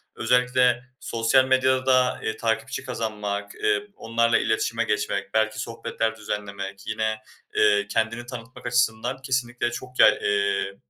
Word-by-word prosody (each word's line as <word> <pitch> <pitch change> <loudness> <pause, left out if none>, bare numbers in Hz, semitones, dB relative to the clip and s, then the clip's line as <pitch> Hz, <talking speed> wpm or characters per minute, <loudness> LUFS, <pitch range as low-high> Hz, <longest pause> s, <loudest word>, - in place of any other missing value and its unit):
Özellikle 125 0 +2 0.2
sosyal 115 +3 +2
medyada, 130 -1 +3
eee, 110 - -2
takipçi 115 +3 -2
kazanmak, 105 -4 -4
eee, 105 -1 0
onlarla 115 0 +2
iletişime 110 +1 0
geçmek, 105 -2 -2
belki 110 0 +1
sohbetler 115 -1 -3
düzenlemek 100 -2 -6
yine, 110 0 -1 0.4
eee, 100 -1 +4
kendini 115 +3 -1
tanıtmak 120 0 -9
açısından 125 +1 0
kesinlikle 125 -2 -1
çok 125 +1 -8
yay - - +7
eee, 100 -1 0
115 Hz, 120 wpm, -25 LUFS, 105-125 Hz, 0.4 s, yay